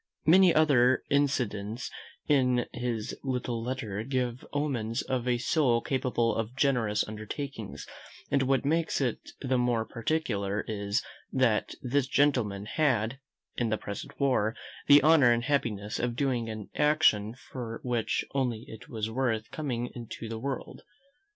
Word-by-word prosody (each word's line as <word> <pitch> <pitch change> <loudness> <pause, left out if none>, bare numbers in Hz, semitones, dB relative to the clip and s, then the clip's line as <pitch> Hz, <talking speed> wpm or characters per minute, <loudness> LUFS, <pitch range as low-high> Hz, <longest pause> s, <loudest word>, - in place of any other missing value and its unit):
Many 185 +3 +7
other 130 -6 +4
incidents 125 -6 0 0.3
in 125 -4 +3
his 120 -3 -3
little 125 -3 -2
letters 115 -4 -4
give 125 -2 -1
omens 130 -5 -1
of 125 -2 -2
a 125 -1 +2
soul 120 -1 +2
capable 120 -2 0
of 115 +2 -3
generous 120 -7 +1
undertakings; 110 +1 -6 0.5
and 140 - +3
what 135 0 +1
makes 165 +3 +1
it 125 -5 -2
the 130 -2 +1
more 120 -2 +1
particular 110 -6 -1
is, 100 -1 -1 0.3
that 125 -5 +1
this 130 +1 +1
gentleman 125 -8 +1
had, 130 -2 +1 0.4
in 120 -2 +1
the 110 - +1
present 100 -1 -7
war, 125 -6 +2 0.3
the 145 0 +8
honour 150 -6 +6
and 120 0 +2
happiness 110 -7 -1
of 120 -1 -1
doing 125 -4 0
an 110 -2 -7
action 150 -8 +3
for 120 -3 -7
which 120 -3 0
only 125 -5 -1
it 110 - -11
was 110 -2 -2
worth 115 -3 -1
coming 125 -6 -3
into 115 -1 -7
the 110 0 -5
world. 135 +2 -5
125 Hz, 140 wpm, -29 LUFS, 110-135 Hz, 0.5 s, the